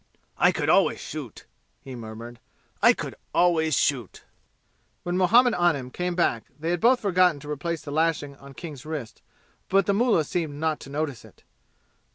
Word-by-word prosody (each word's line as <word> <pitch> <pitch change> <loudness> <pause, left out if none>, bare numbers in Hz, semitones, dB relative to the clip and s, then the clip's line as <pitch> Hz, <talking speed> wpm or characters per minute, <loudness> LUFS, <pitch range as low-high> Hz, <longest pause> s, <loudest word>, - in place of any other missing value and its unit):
"I - - +5
could - - -2
always - - +3
shoot," - - -8 0.3
he 135 - -10
murmured; 115 +1 -9 0.4
"I - - +7
could - - -4 0.2
always 160 -4 +3
shoot." 125 -8 -1 0.8
When 175 0 -2
Muhammad 230 +7 +5
Anim 150 -8 +1
came 180 +3 -3
back 120 -10 +1
they 165 +2 -2
had 175 - -1
both 250 +2 +5
forgotten 180 -5 +3
to 150 +1 -7
replace 165 +3 -3
the 145 - -7
lashing 155 -2 0
on 140 -1 -14
King's 150 -5 -8
wrists, 150 -8 -6 0.5
but 195 0 +3
the 200 - +2
mullah 220 -5 +3
seemed 155 -1 -3
not 155 +1 -1
to - - -11
notice 145 -3 -3
it. - - -19
160 Hz, 170 wpm, -25 LUFS, 140-180 Hz, 0.8 s, I